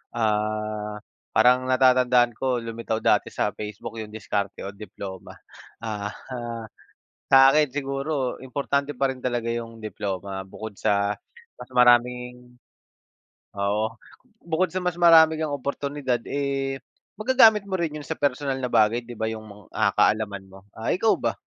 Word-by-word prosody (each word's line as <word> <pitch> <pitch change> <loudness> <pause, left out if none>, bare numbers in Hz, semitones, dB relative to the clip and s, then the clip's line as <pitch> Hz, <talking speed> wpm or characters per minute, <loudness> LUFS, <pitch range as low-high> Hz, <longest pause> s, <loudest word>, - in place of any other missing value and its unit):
Ah, 105 -1 -1 0.4
parang 125 +3 +5
natatandaan 125 -2 +4
ko, 130 -2 0
lumitaw 115 -1 -4
dati - - +3
sa - - 0
Facebook 105 +1 -7
'yong 105 0 -9
diskarte 100 -2 -3
o - - -4
diploma. 100 -2 -9 0.5
Ah, 105 -2 -3
ha 120 -3 -7 0.7
sa 135 0 +8
akin 150 -1 +4
siguro 140 -1 -2
importante 140 +2 -1
pa 135 -1 +2
rin 130 - -12
talaga 120 -2 -1
'yong 115 -1 -5
diploma. 95 -2 -4
Bukod 110 +2 -8
sa 100 0 +1 0.5
mas - - -10
maraming 125 0 +3 1.0
oo. 105 +2 +1 0.6
Bukod 170 +2 +1
sa 185 - 0
mas 180 -1 -1
marami 160 -2 +7
kang 155 -2 -1
oportunidad, 140 -2 -2
eh, 135 -1 -2 0.4
magagamit 220 -3 +5
mo 190 - -1
rin 155 -3 -2
yun 150 - -8
sa - - -3
personal 135 0 0
na 125 - -1
bagay, 110 +3 +3
'di 120 - -8
ba 110 0 -1
yung 110 -1 -7
mga, 105 -1 -13
ah, 105 -2 +2
kaalaman 100 -3 +1
mo. 95 +1 -14 0.2
Ah, 110 - -3
ikaw 220 +4 +3
ba? - - -1
120 Hz, 150 wpm, -25 LUFS, 110-140 Hz, 1.0 s, sa